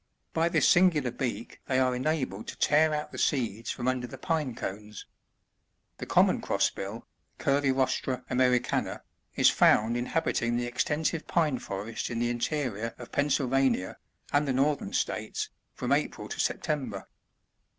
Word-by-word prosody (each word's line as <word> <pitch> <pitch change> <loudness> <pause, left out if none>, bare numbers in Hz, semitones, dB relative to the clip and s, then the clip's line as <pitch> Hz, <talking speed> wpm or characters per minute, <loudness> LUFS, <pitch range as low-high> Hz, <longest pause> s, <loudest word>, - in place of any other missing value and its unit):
By 165 +1 +2
this 165 -2 +3
singular 165 -8 +4
beak 120 -2 -4
they 130 - +1
are 130 -1 +2
enabled 130 -6 -2
to - - -7
tear 155 +1 +4
out 150 0 -3
the - - -7
seeds 115 -5 0
from 120 - -3
under 130 -1 0
the 135 - -9
pine 150 -3 -1
cones. 105 +1 -6 0.9
The - - -6
Common - - +4
Crossbill, 100 +4 -1 0.2
— - - -45
Cvrcitrstta 130 -2 +1
^mericanai 125 -1 +1 0.4
^ts - - +6
found 110 +2 +4
inhabiting 120 -2 0
the 120 - -1
ex 125 +2 0
tensive 155 +2 -1
pine 155 -7 +1
forests 105 +3 -5
in 120 - -3
the 120 +1 0
interior 120 -3 -2
of 120 - -10
Pennsylvania, 135 -7 +1 0.4
and 145 0 +3
the 135 - +1
Northern 140 +2 +1
States, - - -2 0.3
from - - -3
April - - 0
to - - -6
September. 130 -10 -2
130 Hz, 150 wpm, -28 LUFS, 120-145 Hz, 0.9 s, ^ts